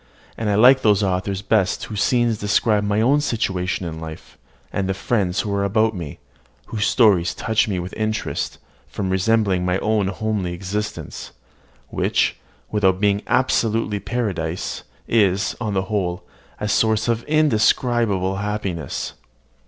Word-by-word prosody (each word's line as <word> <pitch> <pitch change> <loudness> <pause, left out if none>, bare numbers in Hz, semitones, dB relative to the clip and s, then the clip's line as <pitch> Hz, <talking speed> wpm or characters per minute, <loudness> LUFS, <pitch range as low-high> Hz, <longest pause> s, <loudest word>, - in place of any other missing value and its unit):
And 110 -2 -2
I 100 - +2
like 125 +5 +6
those 105 -2 +3
authors 95 +1 -1
best 100 -2 +1
whose 105 -2 -4
scenes 120 -3 +2
describe 105 +1 +2
my 105 +1 +1
own 140 +6 +3
situation 95 -9 -1
in 80 -1 -5
life, 80 -1 -9 0.4
and 95 -1 -1
the 95 - 0
friends 100 -3 0
who 105 - -3
are 100 0 0
about 110 +2 +2
me, 85 -6 -6 0.5
whose 105 -2 -1
stories 100 -8 +3
touch 110 0 +1
me 100 -3 -1
with 90 +1 -5
interest, 110 0 -2 0.3
from 95 -2 -3
resembling 95 -1 +2
my 90 0 +1
own 105 -1 +1
homely 100 -2 -2
existence, 95 -2 -5 0.6
which, - - 0 0.3
without 95 -3 +2
being 100 0 +2
absolutely 115 -4 +1
paradise, 95 -7 -3 0.3
is, 100 -3 +2
on 105 -4 -2
the 95 - +1
whole, 95 -3 -2 0.4
a 105 - -2
source 110 +1 +2
of 115 -1 +1
indescribable 115 -8 +2
happiness." 100 -7 -3
105 Hz, 145 wpm, -21 LUFS, 95-110 Hz, 0.6 s, like